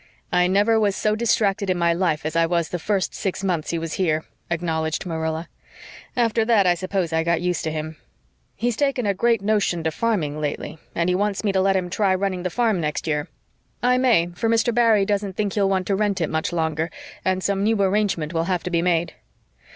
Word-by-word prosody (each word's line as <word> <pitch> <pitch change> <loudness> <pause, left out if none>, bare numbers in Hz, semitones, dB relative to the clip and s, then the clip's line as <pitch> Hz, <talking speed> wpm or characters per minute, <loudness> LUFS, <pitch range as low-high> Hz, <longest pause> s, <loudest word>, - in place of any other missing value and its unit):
"I 180 0 +3
never 205 +4 +3
was 205 -2 +1
so 215 0 +1
distracted 205 -3 +1
in 185 - +1
my 170 -1 +2
life 170 -4 0
as 155 +1 -3
I 165 0 +3
was 170 -1 0
the 175 - -3
first 195 +1 -1
six 195 0 -3
months 175 -5 -1
he 170 - -1
was 165 -1 -4
here," 160 -3 +1 0.3
acknowledged 160 -1 -1
Marilla. 160 -1 -3 0.7
"After 230 -2 +2
that 220 -3 +3
I 180 - +5
suppose 185 -1 -2
I 160 0 +2
got 170 0 +1
used 180 0 -1
to 160 - -1
him. 155 0 -5 0.6
He's 240 +2 -1
taken 275 -3 0
a 200 - +2
great 230 +1 +1
notion 200 -5 +1
to 160 - 0
farming 155 -8 -1
lately, 150 +1 -4 0.2
and 170 +2 +1
wants 205 +2 0
me 205 - +2
to 190 -1 +2
let 195 0 +2
him 185 -1 0
try 195 -1 +2
running 185 -1 -1
the 180 - -2
farm 220 -3 +1
next 150 -1 -2
year. 150 -2 -1 0.6
I 250 +1 +3
may, 230 -10 +3
for 225 +6 -1
Mr. 230 +1 +2
Barry 225 -4 +4
doesn't 200 -2 -1
think 205 -2 -1
he'll 200 -2 +2
want 190 -1 0
to 200 - +1
rent 205 -1 0
it 165 - -1
much 160 +2 -1
longer, 160 -1 -1 0.3
and 185 0 0
some 200 -1 0
new 215 +1 +2
arrangement 195 -5 +1
will 165 0 0
have 180 -1 -1
to 180 - -4
be 170 -1 +2
made." 170 -1 +1
185 Hz, 220 wpm, -23 LUFS, 165-210 Hz, 0.7 s, I